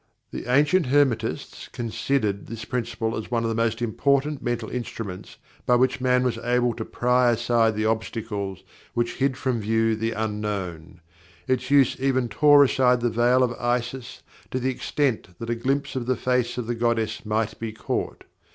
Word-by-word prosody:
The 125 - -5
ancient 150 +4 +3
Hermetists 125 -5 0
considered 115 -3 -1
this 110 -1 -7
Principle 115 -2 -2
as 110 - -5
one 115 -1 0
of 115 - 0
the 115 - -1
most 115 +1 0
important 140 +5 +1
mental 120 -2 -2
instruments 115 -6 -6 0.3
by 125 - +5
which 130 +1 +2
man 125 0 +3
was 120 -2 -1
able 120 0 +1
to 110 - -4
pry 125 0 +2
aside 115 -1 +2
the 110 +1 -1
obstacles 110 -3 -3 0.3
which 120 0 -1
hid 135 -1 +1
from 130 -4 -1
view 110 +1 +1
the 115 +1 -2
Unknown. 100 -6 -4 0.5
Its 130 0 0
use 140 -2 +4
even 130 -2 +1
tore 145 +5 +6
aside 125 -2 +3
the 120 -1 +1
Veil 120 +3 +3
of 125 - +1
Isis 120 +1 -2 0.3
to - - -2
the 130 +1 0
extent 125 - -2
that 115 +3 -4
a - - +1
glimpse 135 +4 -1
of 125 -2 -3
the 130 -2 +1
face 125 -1 0
of 125 - -2
the 120 - -2
goddess 115 -2 -1
might 110 0 -1
be 115 -1 -4
caught. 110 - -4
120 Hz, 175 wpm, -24 LUFS, 110-130 Hz, 0.5 s, tore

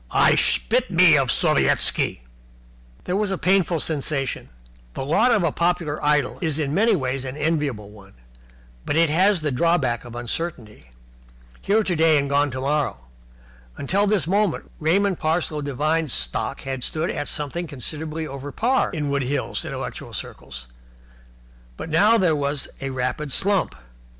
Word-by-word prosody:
"I - - +4
spit - - +2
me - - +6
of - - +2
Sovietski!" - - +2 0.8
There 180 - -2
was 205 0 0
a 195 - -1
painful 185 -3 +2
sensation. 140 -3 -3 0.5
The - - -4
lot 210 - +3
of 215 -6 +3
a 165 - +1
popular 170 -3 -1
idol 150 -3 +1
is 160 -4 0
in 145 -2 -1
many 215 +5 +3
ways 130 -4 -2
an 130 +1 -6
enviable 145 -9 -2
one, 100 -2 -16 0.7
but - - -2
it 165 -1 +3
has 185 +2 +3
the 150 -2 -1
drawback 135 -4 +1
of 120 -1 -10
uncertainty. 120 - -5 0.7
Here 215 +2 +2
today 165 -5 +3
and 140 0 0
gone 145 +1 +2
tomorrow. 135 - -1 0.8
Until 195 +9 0
this 200 -5 +2
moment 200 0 0
Raymond 185 +4 +1
Parsloe 155 -1 -1
Devine's 150 +1 -1
stock 60 -1 -1
had 135 -2 -5
stood 160 +4 -2
at 145 - -4
something 160 +4 -3
considerably 155 +3 -5
over 140 0 -7
par 250 - +1
in 150 -5 -3
Wood 140 0 0
Hills 135 +2 -2
intellectual - - -6
circles, - - -8 1.1
but - - -7
now 205 +9 +4
there 180 -7 +2
was 145 -1 -1
a 135 - -3
rapid 130 +3 -3
slump. 195 +6 +1
150 Hz, 150 wpm, -23 LUFS, 135-175 Hz, 1.1 s, me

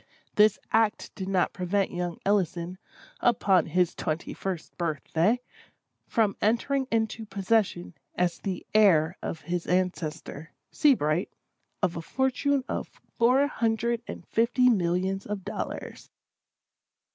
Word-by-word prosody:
This 210 -1 +5 0.2
act 220 -1 +1
did 190 -2 -6
not 185 -2 +1
prevent 190 +1 0
young 175 -1 -3
Ellison, 185 -2 0 0.4
upon 195 -7 +3
his 175 +2 +2
twenty 155 +2 -3
first 185 -4 -5
birth 160 -5 -2
day, 210 +10 +3 0.7
from 215 -3 +1
entering 260 +5 +1
into 225 0 0
possession, 200 -3 0 0.2
as 180 -1 0
the 190 -3 -4
heir 180 -6 +5
of 160 - -5
his 175 -1 -3
ancestor, 165 -4 -2 0.2
Seabright, 175 - +2 0.5
of 180 -2 +1
a - - -3
fortune 265 - 0
of - - -3 0.3
four 255 +4 +5
hundred 235 -3 0
and - - -8
fifty 245 +2 +3
millions 190 -1 0
of 205 -2 -4
dollars. - - -6
195 Hz, 120 wpm, -27 LUFS, 175-225 Hz, 0.7 s, This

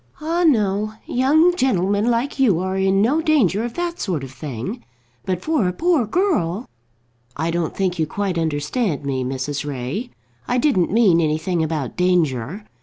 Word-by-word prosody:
"Ah, 330 +3 0
no. 215 - +2
Young 310 +8 +3
gentlemen 205 - +1
like 240 +4 -1
you 215 -11 +4
are 185 +1 -2
in 195 +1 +2
no 285 +8 +2
danger 255 - +2
of 240 -1 -5
that 345 0 -3
sort 170 -8 -2
of 135 - -8
thing. 135 - -6 0.4
But 185 -1 -2
for 310 - +1
a 180 - -1
poor 325 - +1
girl 240 - 0 0.3
" 120 - -42 0.3
"I 160 +3 -1
don't 170 -1 -2
think 185 -3 -1
you 160 - +1
quite 195 0 -2
understand 155 - -1
me, 130 -2 -1
Mrs. 135 +3 -3
Ray. 145 - -4 0.4
I 250 - +1
didn't 240 - +2
mean 195 -6 +4
anything 160 +3 0
about 155 -5 -2
danger. 175 - 0
190 Hz, 170 wpm, -21 LUFS, 160-250 Hz, 0.4 s, you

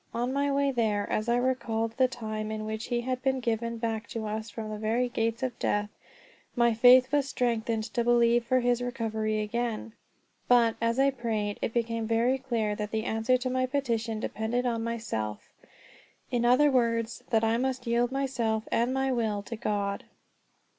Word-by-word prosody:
On 245 +2 -1
my 280 +1 +1
way 280 0 +2
there, 215 -5 0
as 215 +2 -1
I 235 - +3
recalled 235 -3 0
the 260 -1 +5
times 215 -3 -5
in 215 0 -4
which 220 +1 -4
he 240 -1 -1
had 255 +1 -3
been 265 0 +1
given 235 -1 -2
back 225 -1 -3
to 225 -1 -5
us 215 +1 -4
from 215 0 -6
the 210 - -5
very 230 +3 +1
gates 230 -1 -1
of 255 -3 -3
death, 205 0 0 0.6
my 235 -2 +3
faith 250 +3 +6
was 285 -1 +1
strengthened 230 -3 0
to 235 - +1
believe 235 0 +4
for 255 +2 +2
his 245 0 +1
recovery 220 -3 -2
again. 230 0 -3 0.5
But, 235 -2 +4
as 230 +1 +1
I 275 +1 +4
prayed, 220 -5 -2
it - - -1
became 230 -1 -1
very 235 +4 +2
clear 230 -5 -1
that 210 -1 -3
the 220 0 -2
answer 225 +4 +1
to 255 +1 -3
my 255 0 +1
petition 235 -5 -1
depended 225 +3 -2
on 230 -2 -1
myself; 220 - -4 0.8
in 240 -1 +1
other 270 +4 +5
words, 230 -2 0
that 225 -1 +2
I 225 +1 +2
must 260 -1 -2
yield 240 +1 +1
myself 245 -5 -1
and 235 +2 +2
my 265 0 +1
will 220 -5 -1
to 230 - -6
God. 200 -2 -2
235 Hz, 185 wpm, -28 LUFS, 220-250 Hz, 0.8 s, faith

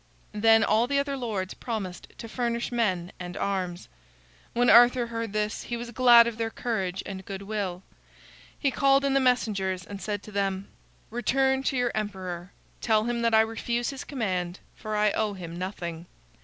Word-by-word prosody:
Then 225 +1 +5
all 225 +3 +3
the 280 +2 +1
other 280 0 0
lords 215 -7 -3
promised 195 -7 -5
to 230 - -7
furnish 235 0 -2
men 185 -7 0
and 175 -1 -6
arms. 185 -3 -2 0.7
When 245 +1 +2
Arthur 240 +2 +7
heard 230 -2 -4
this, 210 +1 -2
he 240 - -3
was 235 0 -6
glad 240 -1 +7
of 230 -1 -4
their 225 0 0
courage 195 -6 -3
and 190 -1 -6
good 195 0 -7
will. 195 -3 -3 0.7
He 275 - +1
called 275 +1 +3
in 275 - +2
the 275 - +4
messengers 200 -8 +1
and 200 -2 -8
said 205 -2 -3
to 215 - -11
them: 195 -1 -2 0.4
"Return 265 +3 +1
to 270 - +1
your 245 -1 +1
emperor. 185 -4 -4 0.3
Tell 220 -2 +3
him 240 +1 -1
that 230 -1 +3
I 220 - +7
refuse 235 +2 -1
his 275 - -7
command, 185 - -2 0.2
for 215 -1 -5
I 210 0 +3
owe 215 -1 0
him 170 -3 -8
nothing. 175 -2 -5
220 Hz, 180 wpm, -27 LUFS, 190-240 Hz, 0.7 s, Arthur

